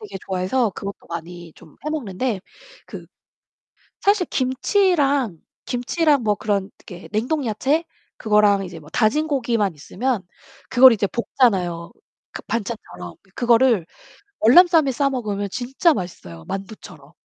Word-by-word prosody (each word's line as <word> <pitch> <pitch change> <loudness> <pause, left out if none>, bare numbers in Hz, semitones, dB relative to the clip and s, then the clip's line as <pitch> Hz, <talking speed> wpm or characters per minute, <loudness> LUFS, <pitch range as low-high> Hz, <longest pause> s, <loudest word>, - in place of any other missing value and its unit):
되게 425 - -8
좋아해서 190 +6 0
그것도 200 +1 -8
많이 170 0 -8
좀 155 - -18
해 305 - -2
먹는데 240 -6 -3 0.5
그 - - -10 0.9
사실 400 -3 +2
김치랑, 275 - +1 0.3
김치랑 280 +3 +1
뭐 210 -2 +2
그런 200 -1 -2
이렇게 180 -1 -12
냉동 255 +8 -1
야채 270 +9 0 0.3
그거랑 210 -2 +3
이제 175 -3 -9
뭐 150 - -15
다진 270 - +1
고기만 235 - 0
있으면 215 - -3 0.5
그걸 255 0 +8
이제 210 -2 0
볶잖아요, 185 -8 0 0.4
그 - - -8
반찬처럼. 195 - -5 0.2
그거를 235 -6 +3 0.5
월남쌈에 320 +4 +6
싸 275 +2 +1
먹으면 205 -6 -3
진짜 260 - +1
맛있어요, 85 - -7
만두처럼. 190 -7 -8
225 Hz, 290 characters per minute, -21 LUFS, 190-265 Hz, 0.9 s, 그걸